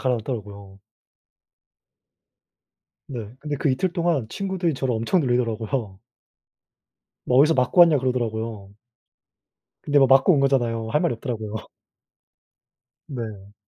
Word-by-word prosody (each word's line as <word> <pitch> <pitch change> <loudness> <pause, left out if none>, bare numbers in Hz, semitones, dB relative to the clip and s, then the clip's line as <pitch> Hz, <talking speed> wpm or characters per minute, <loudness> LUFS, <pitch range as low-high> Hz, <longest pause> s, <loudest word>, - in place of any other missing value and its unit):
가라앉더라고요. 105 -6 -4 2.3
네. 115 -5 -7
근데 150 -1 -4
그 145 - 0
이틀 150 +8 0
동안 170 - 0
친구들이 190 -3 -2
저를 130 -1 -2
엄청 115 +11 +1
놀리더라고요. 115 - -2 1.3
"뭐 125 - +2
어디서 155 +3 +5
맞고 130 +6 +4
왔냐."고 160 -6 +5
그러더라고요. 115 -5 -3 1.1
근데 145 -1 +3
뭐 135 - +5
맞고 135 +7 +5
온 145 - +2
거잖아요. 120 -5 +1
할 150 - +2
말이 170 -6 +1
없더라고요. 110 -3 -5 1.5
네. 110 -6 -7
125 Hz, 275 characters per minute, -23 LUFS, 110-145 Hz, 2.3 s, 어디서